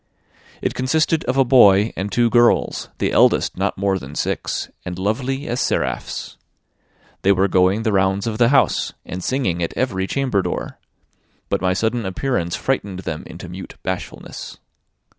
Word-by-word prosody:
It - - 0
consisted 160 +5 +1
of 125 +2 0
a 135 - +5
boy 105 -4 +6
and 100 +2 -3
two 120 -1 +2
girls, 120 -1 +3
the - - 0
eldest - - +3
not - - -1
more 95 0 +1
than 70 -1 -10
six, - - -2 0.2
and 90 0 -5
lovely 130 +8 -2
as 120 +2 -1
seraphs. 65 -2 -2 0.8
They 100 - +4
were 95 0 +3
going 95 +3 +2
the 110 - +1
rounds 95 0 +1
of 110 -1 -3
the 120 -1 +5
house, 135 -1 +2
and 90 +1 -6
singing 95 -11 0
at 85 - -3
every 95 -7 0
chamber 130 -7 0
door; 90 - -4 0.7
but - - 0
my 90 -1 +2
sudden 110 +4 0
appearance 95 -2 -1
frightened 100 -8 -2
them 80 -4 -4
into 90 +2 -9
mute 90 +2 -9
bashfulness. 95 -1 -6
100 Hz, 160 wpm, -21 LUFS, 95-125 Hz, 0.8 s, boy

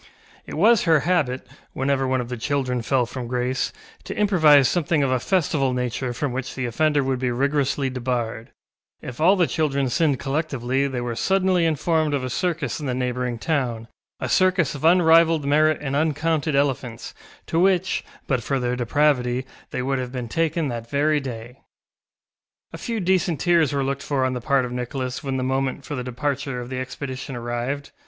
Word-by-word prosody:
It - - -6
was 215 +6 +4
her 160 -3 +4
habit, 150 -7 0 0.3
whenever 135 0 0
one 130 -1 +1
of 120 - -7
the 125 - -3
children 125 0 -1
fell 125 +1 +1
from 125 0 -6
grace, 125 +1 -1 0.3
to - - -6
improvise 155 -10 +5
something 160 0 +1
of 135 - +1
a 130 - +2
festival 145 -5 +1
nature 125 0 -2
from 135 +2 -2
which 130 +1 -4
the 130 - -2
offender 150 +4 +1
would 130 -1 -1
be 125 -1 0
rigorously 140 +2 0
debarred; 120 -3 -3 0.5
if 125 +3 -7
all 185 +5 +6
the 180 -3 +3
children 140 -2 0
sinned 145 +1 +2
collectively 135 -2 -1
they 130 -3 -3
were 120 -1 -3
suddenly 185 +1 +2
informed 155 -1 +1
of 135 - -2
a 130 - -3
circus 165 -7 -1
in 145 -3 -4
a 125 - -1
neighbouring 125 -1 -2
town, 120 -5 -2 0.3
a - - -3
circus 185 -5 +2
of 145 - -8
unrivalled 165 -2 +5
merit 155 +2 +3
and 140 -2 -2
uncounted 155 0 0
elephants, 135 -4 -1 0.3
to 165 - 0
which, 185 0 +2 0.2
but 130 -4 0
for 135 +4 -1
their 125 0 -1
depravity, 125 0 +1 0.2
they 125 - -3
would 135 0 0
have 125 -1 -4
been 125 -2 -4
taken 165 +4 0
that 115 -2 -5
very 150 +2 +2
day. 125 -2 -8 1.1
A - - -7
few 230 -2 -3
decent 180 -4 +1
tears 170 -3 +3
were 140 -1 0
looked 140 +1 -2
for 135 -3 0
on 130 - 0
the 125 - -4
part 140 -1 +2
of 125 - -6
Nicholas 125 +2 -4
when 135 -1 -2
the 130 - -1
moment 130 +1 -1
for - - -6
the 125 -3 -3
departure 135 +1 -3
of 120 +1 -7
the 130 - -3
expedition 130 +1 -6
arrived. 120 +4 -4
135 Hz, 190 wpm, -23 LUFS, 125-155 Hz, 1.1 s, all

